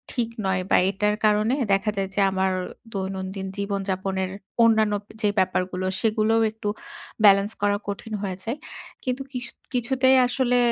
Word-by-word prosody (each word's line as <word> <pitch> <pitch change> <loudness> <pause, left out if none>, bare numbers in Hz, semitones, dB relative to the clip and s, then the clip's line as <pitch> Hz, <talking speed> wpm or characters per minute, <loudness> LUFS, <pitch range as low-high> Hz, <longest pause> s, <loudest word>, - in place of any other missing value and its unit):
ঠিক 235 -2 0 0.2
নয় 185 -1 +1
বা - - +6
এটার 210 +1 +1
কারণে 215 +4 +3 0.2
দেখা 210 +2 +1
যায় 195 -1 -1
যে - - 0
আমার 190 0 +1 0.4
দৈনন্দিন 190 0 -4
জীবনযাপনের 195 -1 -2 0.3
অন্যান্য 220 -2 +4 0.3
যে 210 - +3
ব্যাপারগুলো, 185 0 0 0.2
সেগুলোও 225 0 +2
একটু 220 -1 -4 0.6
ব্যালেন্স 200 +1 +6
করা 205 0 +2
কঠিন 215 +2 -5
হয়ে 190 -2 -3
যায়। 235 +6 -3 0.5
কিন্তু 255 +1 -2
কিশু 250 -2 -5 0.2
কিছুতেই 260 +2 +3
আসলে 250 -1 +1
205 Hz, 140 wpm, -24 LUFS, 190-225 Hz, 0.6 s, বা